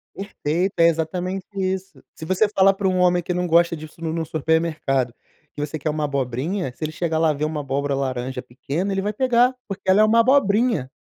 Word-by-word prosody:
Perfeito, 190 -2 -2
é 165 0 +6
exatamente 180 +4 -2
isso. 190 0 -3
Se 160 - -9
você 190 +5 +2
fala 195 -1 +4
para 195 -1 -1
um 185 -1 0
homem 180 -1 +3
que 180 - -3
não 180 0 -1
gosta 170 0 +3
disso 155 0 -10
num 160 -1 -3
num 165 -1 -2
supermercado, 155 -6 0 0.4
que 145 - -7
você 150 +1 -5
quer 155 +2 -2
uma 150 0 -2
abobrinha, 140 +4 -2
se 155 - -5
ele 155 - -3
chegar 160 0 -1
lá 160 -1 +3
e - - -6
ver 150 - -1
uma 155 -1 -2
abóbora 140 0 -2
laranja 130 -1 -3
pequena, 155 +10 -4
ele 195 0 -1
vai 210 +2 -1
pegar, 250 +2 +3
porque 195 -1 -6
ela 190 +2 +5
é - - +7
uma 225 +2 +4
abobrinha, 230 - +2
170 Hz, 220 wpm, -22 LUFS, 150-195 Hz, 0.4 s, é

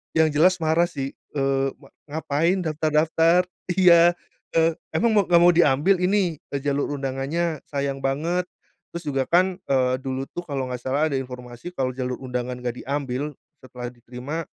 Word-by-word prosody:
Yang 160 -2 +3
jelas 185 +3 +6
marah 160 +1 +2
sih, 135 -3 -5 0.2
eee, 135 -1 +1
ma 135 - -17 0.2
ngapain 160 +4 0
daftar-daftar? 160 +2 +2 0.2
Iya. 175 -2 +6 0.4
eee, 165 0 +3 0.2
emang 220 +7 +2
mau 205 - +5
nggak 175 -1 +4
mau 175 0 +6
diambil 160 +3 +4
ini, 185 -3 +2 0.2
eee, 140 - -1
jalur 140 +1 -1
undangannya 145 +4 -2
sayang 140 -1 -2
banget 165 +7 0 0.5
terus 170 -2 -7
juga 135 -2 +1
kan, 180 +6 +2 0.2
eee, 130 -1 +3
dulu 135 0 -3
tuh 175 - -4
kalau 140 -5 -3
nggak 125 -1 -6
salah 140 +4 +1
ada 140 - -2
informasi 125 +2 -6
kalau 130 -6 -2
jalur 125 -1 -3
undangan 125 -1 -4
nggak 125 0 -5
diambil 140 +1 -2 0.3
setelah 125 -1 -7
diterima, 125 +6 -6
145 Hz, 160 wpm, -24 LUFS, 130-170 Hz, 0.5 s, jelas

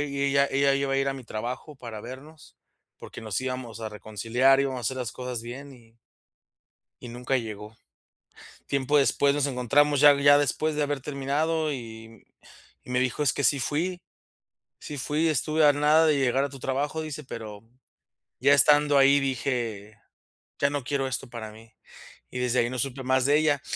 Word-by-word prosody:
i 140 -1 -2
ella 140 0 +3
ella 140 0 +2
iba 140 0 -1
a 135 - +1
ir 135 0 +1
a 135 - 0
mi 130 -2 -9
trabajo 125 +7 -6
para 115 -4 -8
vernos, 145 +6 -12 0.4
porque - - -10
nos 110 0 -3
íbamos 125 -3 -5
a 110 - -4
reconciliar, 115 +6 +1
íbamos 135 -2 -1
a - - -6
hacer 130 +3 -2
las 125 -5 -4
cosas 125 -2 -5
bien 135 +4 -9
y. 115 -3 -20 1.0
Y 120 - -8
nunca 125 +2 -2
llegó, 110 -2 -7 0.9
tiempo 140 +1 +1
después 140 0 +2
nos 145 -1 +1
encontramos 140 +3 +2
ya 145 0 +8
ya 145 0 +7
después 150 +2 0
de 150 - 0
haber 145 -1 -2
terminado 150 +4 -1
y 115 -3 -10 0.6
y - - -12
me 125 - +1
dijo: 130 +3 -1
"Es 145 - +2
que 140 - -3
sí 140 +2 +3
fui, 175 +7 -2 0.8
sí 145 - -8
fui, 150 +5 0
estuve 155 +1 +2
a 145 - +6
nada 150 +3 +4
de 150 -2 +3
llegar 135 0 +1
a - - -5
tu 135 -1 -11
trabajo", 145 +5 -2
dice, 155 -1 -7
pero 110 -4 -8 0.8
ya 140 +2 +5
estando 145 0 +5
ahí 140 +1 +5
dije: 120 -6 -3 0.6
"Ya 140 - +2
no 145 -3 -3
quiero 135 0 -1
esto 130 0 -4
para 115 -2 -7
mí", 110 +1 -16 0.6
y 125 - -6
desde 125 0 +1
ahí 120 - +1
no 130 - -5
supe 135 +2 -3
más 130 0 +2
de 145 +2 +4
ella, 150 -3 +1
135 Hz, 185 wpm, -26 LUFS, 120-145 Hz, 1.0 s, ya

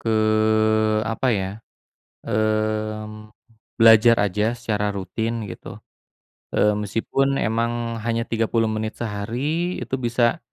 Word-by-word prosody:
ke, - - -4 1.0
apa 120 - -2
ya, 95 0 -2 0.8
mmm, 110 0 -2 0.5
belajar 115 +1 +7
aja 105 +3 -1
secara 105 -3 -1
rutin 110 +4 -3
gitu, - - -9 0.9
eee, 105 - +4
meskipun 135 +7 0
emang 115 -1 0 0.3
hanya 115 0 0
30 115 0 0
menit 110 0 -3
sehari 110 +1 -4 0.4
itu - - -3
bisa 120 0 +1
110 Hz, 105 wpm, -22 LUFS, 105-115 Hz, 1.0 s, belajar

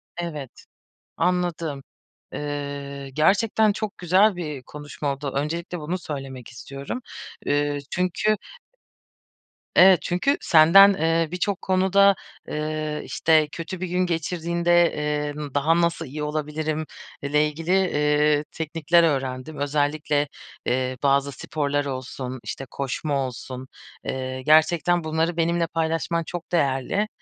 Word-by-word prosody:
Evet. 155 -7 -6 0.5
Anladım. 170 -6 -1 0.5
Iıı, 140 -1 -5
gerçekten 205 - +3
çok 210 0 -5
güzel 185 +3 +4
bir 150 -6 -5
konuşma 145 0 -5
oldu. 140 0 -5
Öncelikle 170 +5 -2
bunu 170 +5 -3
söylemek 135 -6 -7
istiyorum. 140 - -7 0.5
Iıı, 145 0 +1
çünkü 185 +4 +1 1.4
Evet, 185 -1 +7
çünkü 180 +11 +1
senden, 185 +5 +7
ııı, 165 -2 +1
birçok 185 +1 -1
konuda, 190 +1 +4 0.3
ııı, 155 0 -3
işte, 155 -2 +3
kötü 170 +2 -6
bir 185 - -2
gün 180 +1 +1
geçirdiğinde, 170 +1 +1 0.4
ııı, 145 -3 -6
daha 165 +4 +3
nasıl 170 -1 0
iyi 150 +3 -5
olabilirim 155 +1 -2 0.4
ile 150 +2 +2
ilgili, 160 +4 -4 0.7
ııı, 150 - -3
teknikler 165 +1 +2
öğrendim. 135 -1 -1
Özellikle, 145 0 0 0.4
eee, 130 0 0
bazı 140 0 +3
sporlar 145 +1 -2
olsun, 130 -1 -5
işte, 135 +5 -5
koşma 140 0 -2
olsun, 130 +1 -8 0.4
eee, 130 0 -4
gerçekten 160 +4 +4
bunları 160 +2 -1
benimle 170 0 +1
paylaşman 165 +1 -1
çok 175 0 -7
değerli. 155 +6 +1
155 Hz, 115 wpm, -24 LUFS, 140-175 Hz, 1.4 s, Evet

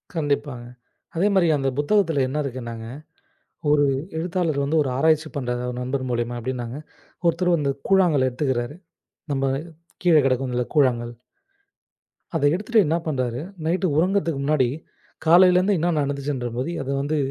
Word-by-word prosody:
கண்டிப்பாங்க. 145 -5 -2 0.5
அதே 180 +5 +2
மாரி 180 -3 +4
அந்தப் 135 -2 -1
புத்தகத்துல 160 -2 +2
என்ன 140 +4 -2
இருக்குன்னாங்க, 120 -4 -6 0.8
1 145 -1 +4 0.3
எழுத்தாளர் 165 -3 -1
வந்து 150 +3 0
1 140 - -3
ஆராய்ச்சி 160 +2 +2
பண்றதா 125 -2 -2
நண்பர் 130 +1 -2
மூலியமா 120 0 -2
அப்டின்னாங்க. 125 +1 -4 0.5
ஒருத்தர் 170 +2 +2
வந்து 145 -3 0 0.2
கூழாங்கல் 175 -9 +4
எடுத்துக்கிறாரு. 130 +1 -2 0.6
நம்ப 135 -1 0 0.6
கீழே 170 -3 +6
கிடக்கும்ல 130 -1 0
கூழாங்கல். 120 -5 +2 1.2
அத 160 - -1
எடுத்துட்டு 215 +4 +2
என்ன 160 +3 +1
பண்றறாரு, 130 -5 -1 0.3
நைட் 180 +3 +1
உறங்குத்துக்கு 170 -4 +1
முன்னாடி 140 -4 +2 0.6
காலையிலருந்து 180 +3 +5
என்ன 170 +2 +1
நடந்துச்சுன்றபோது 140 -2 -2
அத 135 - -7
வந்து, 150 +2 -1
145 Hz, 125 wpm, -23 LUFS, 130-165 Hz, 1.2 s, கீழே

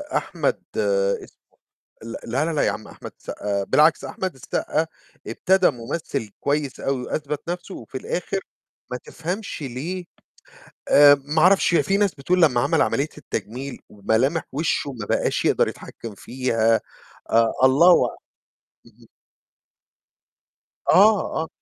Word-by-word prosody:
أحمد 165 -6 -1
اسمه 100 -1 0 0.6
ل 115 +1 -7
لا، 130 +6 0
لا، 165 - -1
لا، 150 - +1
يا - - +3
عم 105 - -7
أحمد - - -10
السقا 100 -1 -3
بالعكس، 155 +7 +4
أحمد 185 -1 -4
السقا 150 +4 -2 0.4
ابتدى 190 0 +3
ممثل 125 -2 -5
كويس 145 -1 -1
أوي 135 -2 -1
وأثبت 150 +4 -4
نفْسه 180 +2 -5
وفي 120 +3 -7
الآخر 180 +7 -3 0.5
ما 125 - -3
تفهمش 180 +1 -5
ليه 150 +8 -4 0.9
آآ، 145 0 +8
ما 155 +2 +1
أعرفش، 185 0 +4
هي 160 -4 +4
فيه 195 +8 +1
ناس 205 -3 +2
بتقول 175 +6 0
لمّا 130 -7 +4
عَمَل - - +2
عملية - - +1
التجميل 130 +5 -6
وملامح 115 +10 0
وشه 145 0 -1
ما 115 -5 -7
بقاش - - 0
يقدَر - - +3
يتحكم 115 -3 -8
فيها، 115 -1 +1 0.5
أ 115 0 +4
الله 160 +7 +6
أع - - -5 0.7
اهم. 115 0 -20 1.8
آه، 205 -3 +4
آه. 160 - -5
140 Hz, 135 wpm, -23 LUFS, 115-170 Hz, 1.8 s, آآ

